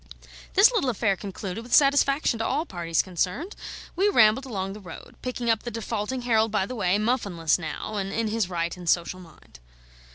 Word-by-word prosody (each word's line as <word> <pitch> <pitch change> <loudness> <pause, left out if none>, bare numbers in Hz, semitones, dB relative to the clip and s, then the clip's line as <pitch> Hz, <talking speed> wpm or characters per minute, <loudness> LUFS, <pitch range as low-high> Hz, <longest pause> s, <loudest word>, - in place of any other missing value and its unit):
This 405 +6 +7
little 395 - +1
affair 215 -4 +1
concluded 195 +1 -6
with 240 +1 +1
satisfaction 275 -3 +3
to 225 - -1
all 295 +5 0
parties 170 - -1
concerned, 185 - -2 0.4
we 390 +4 +3
rambled 240 - +4
along 195 -5 -3
the 210 - -9
road, 180 -5 -11
picking 250 -1 -4
up 225 -2 +2
the 240 - -5
defaulting 230 +2 -3
Harold 225 -2 +2
by 205 -3 +1
the 255 - -6
way, 200 -5 +1
muffinless 200 -8 0
now 170 +6 -5
and 195 -1 -2
in 225 +1 -1
his 215 -4 -1
right 170 -1 -2
and 175 -2 -5
social 175 +2 +1
mind. 165 - -16
215 Hz, 190 wpm, -26 LUFS, 185-250 Hz, 0.4 s, This